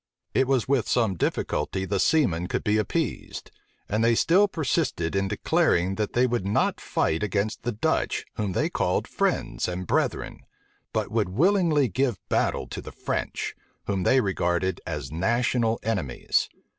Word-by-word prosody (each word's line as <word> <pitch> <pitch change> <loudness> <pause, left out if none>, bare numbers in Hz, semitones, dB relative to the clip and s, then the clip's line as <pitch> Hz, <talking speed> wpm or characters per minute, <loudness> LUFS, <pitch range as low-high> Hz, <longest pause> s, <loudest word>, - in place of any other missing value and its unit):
It 130 0 +3
was 130 -4 +1
with 135 -3 +1
some 115 -5 +2
difficulty 95 +2 -1
the 100 0 -1
seamen 90 - +2
could - - -2
be 105 +1 +2
appeased; 105 - -3 0.4
and 105 +2 0
they 115 0 +4
still 185 - +4
persisted 145 - -1
in 95 0 +1
declaring 90 -1 +1
that 105 +1 -2
they 125 +1 +4
would 120 -5 0
not 100 +2 0
fight 80 0 0
against 105 +2 -1
the 120 - -2
Dutch, 105 - 0
whom 105 -3 -2
they - - +1
called - - 0
friends - - -1
and 90 +1 -4
brethren; - - -1 0.5
but - - -2
would - - +1
willingly 160 - +3
give 120 +1 0
battle - - +1
to - - -5
the - - -9
French, - - -3 0.3
whom 100 -2 -1
they 130 +8 +4
regarded 95 -2 0
as 75 -4 -4
national 115 +5 +1
enemies. 95 - 0
105 Hz, 155 wpm, -26 LUFS, 95-125 Hz, 0.5 s, they